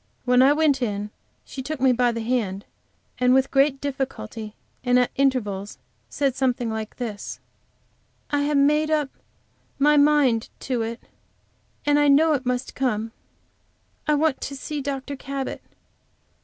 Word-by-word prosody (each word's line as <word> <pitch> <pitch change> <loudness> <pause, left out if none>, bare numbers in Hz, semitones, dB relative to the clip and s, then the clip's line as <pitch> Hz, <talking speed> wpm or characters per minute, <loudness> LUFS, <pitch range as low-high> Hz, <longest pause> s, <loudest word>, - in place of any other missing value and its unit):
When 250 0 +5
I 270 +2 +6
went 295 -3 +2
in 210 -3 -2 0.3
she 265 - -7
took 300 +2 -5
me 260 0 +4
by 245 0 +2
the 230 0 -4
hand, 215 -5 -1 0.5
and 250 0 +4
with 265 0 +2
great 275 0 +3
difficulty, 255 - -5 0.3
and 245 0 +3
at 250 -1 +2
intervals 210 - 0 0.3
said 275 - 0
something 250 -3 0
like 220 -1 -5
this: 220 -5 -6 0.9
"I 290 -1 +2
have 290 0 +1
made 300 +2 +3
up 300 -3 +1 0.7
my 295 +1 +4
mind 285 -6 +3
to 250 -3 -1
it, 230 +1 -4 0.8
and 290 0 +4
I 290 - +4
know 305 +3 +5
it 265 -3 -2
must 250 +1 -2
come. 225 -4 -1 1.0
I 300 - +4
want 305 -1 +1
to 275 - -5
see 290 +2 -5
Dr. 280 0 -4
Cabot. 270 0 -5
265 Hz, 150 wpm, -24 LUFS, 235-285 Hz, 1.0 s, I